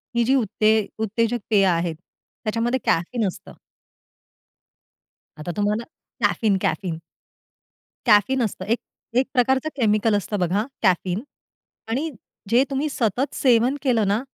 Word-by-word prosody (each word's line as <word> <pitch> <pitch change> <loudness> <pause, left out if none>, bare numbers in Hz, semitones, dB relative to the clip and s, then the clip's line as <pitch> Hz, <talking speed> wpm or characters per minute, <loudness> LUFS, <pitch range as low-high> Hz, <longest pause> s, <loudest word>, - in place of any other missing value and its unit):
ही 235 - +3
जी 265 +4 +3
उत्ते 220 -2 +2 0.2
उत्तेजक 230 +2 0
पेय 200 -3 +4
आहेत, 170 -2 +1 0.5
त्याच्यामध्ये 235 +4 0
कॅफीन 200 +6 +1
असतं. 185 - -8 1.9
आता 175 +3 -4
तुम्हाला 210 +2 0 0.4
कॅफीन 210 -4 +2
कॅफीन. 175 -5 -1 1.1
कॅफीन 225 +6 +4
असतं 190 -3 -3
एक 230 +3 +1 0.4
एक 260 - +4
प्रकारचं 265 +4 +2
केमिकल 215 -3 +2
असतं 205 +1 -2
बघा 185 +5 +1 0.2
कॅफीन 185 +1 +2 0.7
आणि 280 +8 -1 0.4
जे 245 +3 +5
तुम्ही 280 +3 -1
सतत 250 +1 -1
सेवन 250 +1 +3
केलं 235 -7 +2
ना, 205 +4 +1
220 Hz, 120 wpm, -23 LUFS, 200-250 Hz, 1.9 s, जे